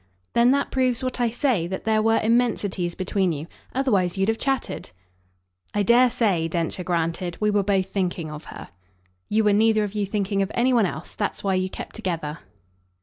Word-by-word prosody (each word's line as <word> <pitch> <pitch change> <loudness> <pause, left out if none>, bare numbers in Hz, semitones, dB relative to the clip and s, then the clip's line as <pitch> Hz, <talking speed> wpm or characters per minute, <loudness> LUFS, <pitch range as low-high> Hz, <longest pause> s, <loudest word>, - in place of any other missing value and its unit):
"Then 235 +1 +5
that 280 +2 +1
proves 255 -1 +1
what 255 -1 -2
I 240 - +3
say 235 - 0
that 190 +1 -5
there 220 -1 +2
were 225 +1 +3
immensities 215 -6 +1
between 190 -1 0
you. 150 -1 -4 0.3
Otherwise 200 -9 +1
you'd 195 +2 +2
have 225 - 0
chattered." 270 -2 -2 0.9
"I 205 - +2
dare 245 +4 +5
say," 195 -9 +1
Densher 170 +2 -2
granted, 170 0 -2
"we 210 0 +2
were 205 -1 +3
both 195 -1 +1
thinking 175 -5 -2
of 150 0 -8
her." - - -10 0.6
"You 220 +1 +2
were 210 -1 +4
neither 215 +1 +4
of 205 -1 -4
you 205 -2 -1
thinking 200 -1 -1
of 195 - -1
any 250 +2 +3
one 225 -5 +4
else. 155 - -7
That's 205 - -3
why 195 -1 +1
you 185 0 0
kept - - -8
together." 165 -7 -3
205 Hz, 195 wpm, -24 LUFS, 180-225 Hz, 0.9 s, Then